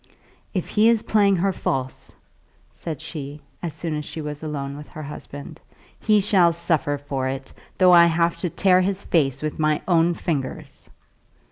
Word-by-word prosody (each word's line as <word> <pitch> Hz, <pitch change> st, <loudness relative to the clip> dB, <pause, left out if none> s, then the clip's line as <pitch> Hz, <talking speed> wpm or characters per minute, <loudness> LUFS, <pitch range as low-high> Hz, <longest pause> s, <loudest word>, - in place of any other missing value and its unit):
"If 185 Hz, -, -2 dB
he 220 Hz, +2 st, +4 dB
is 230 Hz, -2 st, +2 dB
playing 200 Hz, -2 st, +3 dB
her 190 Hz, +2 st, +1 dB
false," 130 Hz, -6 st, -3 dB, 0.6 s
said 155 Hz, -5 st, -6 dB
she, 145 Hz, -2 st, -7 dB, 0.2 s
as 165 Hz, -4 st, -4 dB
soon 160 Hz, 0 st, -3 dB
as 150 Hz, -, -3 dB
she 160 Hz, -, -7 dB
was 150 Hz, -1 st, -5 dB
alone 140 Hz, -3 st, -4 dB
with 150 Hz, +1 st, -9 dB
her 155 Hz, -, -9 dB
old 145 Hz, -, -7 dB
husband, 145 Hz, +1 st, -9 dB, 0.4 s
"he 215 Hz, -1 st, +3 dB
shall 185 Hz, -4 st, +4 dB
suffer 165 Hz, -4 st, 0 dB
for 140 Hz, -2 st, -3 dB
it, 135 Hz, 0 st, -5 dB, 0.2 s
though 185 Hz, -1 st, +6 dB
I 170 Hz, -1 st, +8 dB
have 170 Hz, 0 st, +1 dB
to 180 Hz, -, -1 dB
tear 185 Hz, +1 st, +3 dB
his 195 Hz, +1 st, -1 dB
face 135 Hz, -4 st, +1 dB
with 155 Hz, 0 st, -3 dB
my 155 Hz, -1 st, +2 dB
own 170 Hz, -1 st, +3 dB
fingers." 145 Hz, -7 st, -4 dB
160 Hz, 175 wpm, -23 LUFS, 145-180 Hz, 0.6 s, I